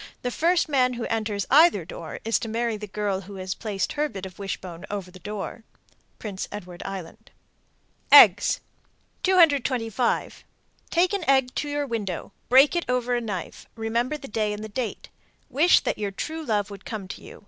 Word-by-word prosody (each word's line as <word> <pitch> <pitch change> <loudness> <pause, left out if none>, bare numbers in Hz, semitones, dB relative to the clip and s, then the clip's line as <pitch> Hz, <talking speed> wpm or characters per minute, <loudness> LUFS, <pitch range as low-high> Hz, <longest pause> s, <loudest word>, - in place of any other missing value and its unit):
The 245 - -1
first 340 +6 +2
man 255 -4 +2
who 235 -1 -4
enters 215 -3 -1
either 320 +5 +6
door - - -8
is 225 - +2
to 225 - -5
marry 230 0 -1
the 210 0 -7
girl 200 -1 -2
who 200 +1 -10
has 185 0 -4
placed 200 -3 -3
her 300 0 0
bit 195 -6 -7
of 190 +1 -11
wishbone 185 -3 -6
over 195 -3 -5
the 185 - -13
door. 210 +3 -6 0.5
Prince 200 -4 -5
Edward 180 -4 -8
Island. 190 -4 -8 0.8
EGGS. - - +8 0.6
225. 270 - +2 0.5
Take 360 +3 +2
an 400 -3 -1
egg 265 -2 +3
to 295 - -2
your 290 0 -1
window; 210 -8 -4 0.2
break 270 +6 +6
it 345 - 0
over 250 -1 0
a 240 - 0
knife; 205 -7 -6
remember 235 +6 -1
the 275 - -10
day 215 -1 -1
and 210 0 -7
date. 245 -2 -4 0.4
Wish 310 +8 +5
that - - -2
your 205 -1 -1
true 315 +11 -5
love 210 -6 -1
would 200 -1 -10
come 210 -4 -6
to - - -8
you. - - -12
225 Hz, 180 wpm, -25 LUFS, 200-270 Hz, 0.8 s, EGGS